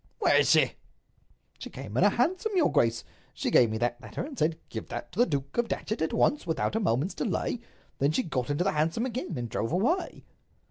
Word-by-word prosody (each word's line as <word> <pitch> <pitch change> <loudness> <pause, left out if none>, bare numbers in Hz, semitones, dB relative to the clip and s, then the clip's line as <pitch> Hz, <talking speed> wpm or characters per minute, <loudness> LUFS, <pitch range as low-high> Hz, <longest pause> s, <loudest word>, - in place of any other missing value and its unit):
"Where - - +4
is - - +4
she?" - - +5 0.9
"She - - -7
came 105 - -8
in 150 - +3
a 205 - +7
hansom, 360 - 0
your 340 -5 +3
grace. 115 0 +2 0.3
She - - -2
gave 120 - +6
me 110 - -2
that 120 +1 -1
letter, - - -5
and 290 -1 -8
said, 160 -6 +1
'Give - - -6
that - - -6
to 200 - -8
the 245 - +5
Duke 140 -2 -3
of 240 - +2
Datchet 220 0 -3
at 160 - 0
once—without 175 - +1
a - - +2
moment's 155 - 0
delay!' 245 - -2 0.4
Then 140 +2 +3
she 255 - +1
got 130 - -2
into 145 +4 +1
the 195 - +1
hansom 160 +10 0
again, 235 - -4
and 120 -1 -3
drove 115 0 -2
away." 300 - 0
165 Hz, 220 wpm, -28 LUFS, -, 0.9 s, a